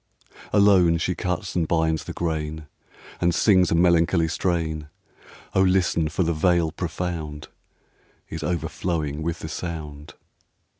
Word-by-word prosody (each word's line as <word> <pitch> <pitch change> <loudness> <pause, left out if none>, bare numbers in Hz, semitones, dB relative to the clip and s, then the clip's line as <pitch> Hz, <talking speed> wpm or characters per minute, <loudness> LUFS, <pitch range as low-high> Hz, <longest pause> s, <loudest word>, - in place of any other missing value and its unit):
Alone 95 -5 +5
she 85 +3 -1
cuts 90 +1 -3
and 85 -3 +1
binds 80 -1 0
the - - -5
grain, 80 -2 -3 0.6
And 85 -1 +2
sings 95 -3 +4
a - - +2
melancholy 85 0 +3
strain; 80 -3 -1 0.7
O 95 - +3
listen! 90 -4 +2
for 85 +4 0
the 85 0 0
Vale 85 0 +2
profound 80 -3 -5 0.8
Is 80 - -6
overflowing 80 -2 -2
with 85 +1 -3
the - - -5
sound. 75 -3 -6
85 Hz, 130 wpm, -24 LUFS, 80-90 Hz, 0.8 s, Alone